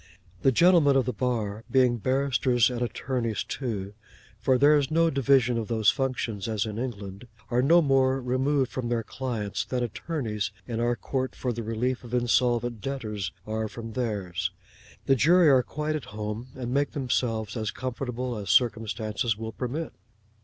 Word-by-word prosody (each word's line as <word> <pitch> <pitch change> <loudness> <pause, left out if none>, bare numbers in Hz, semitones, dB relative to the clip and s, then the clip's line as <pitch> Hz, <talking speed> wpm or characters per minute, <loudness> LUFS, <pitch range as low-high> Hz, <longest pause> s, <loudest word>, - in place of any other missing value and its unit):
The 135 - +4
gentlemen 165 0 +5
of 135 -3 +3
the 125 - -2
bar 115 -4 -2
being 125 -3 +3
barristers 130 0 +2
and 120 -1 -4
attorneys 120 -1 -2
too 105 -7 -4 0.5
(for 130 +3 +3
there 145 +3 +6
is 140 -3 +1
no 165 +1 +3
division 130 -3 +3
of 110 - -4
those 110 -3 +3
functions 125 -6 -2
as 110 -1 -1
in 110 0 -5
England) 105 -3 -6 0.2
are 120 +1 +3
no 165 +6 +5
more 135 -1 +3
removed 130 +2 0
from 125 -2 -3
their 115 -1 0
clients 110 -4 -3
than 125 -1 -2
attorneys 115 -3 -3 0.2
in 115 -1 -3
our 120 +1 +1
Court 130 +1 -3
for 125 -2 -2
the 115 - -4
Relief 120 +4 -2
of 120 0 -4
Insolvent 120 -1 +1
Debtors 105 -8 -4
are, 110 0 -2
from 115 +1 -8
theirs. 105 -8 -2 0.6
The 135 - +4
jury 165 +5 +5
are 130 -2 +6
quite 150 +4 -3
at 145 -6 -4
home, 105 0 -5
and 125 -1 -4
make 140 +1 +1
themselves 120 -5 -1
as 110 -2 -2
comfortable 125 0 -4
as 100 -3 -6
circumstances 110 0 +1
will 110 0 -5
permit. 135 +8 -4
120 Hz, 165 wpm, -27 LUFS, 110-130 Hz, 0.6 s, there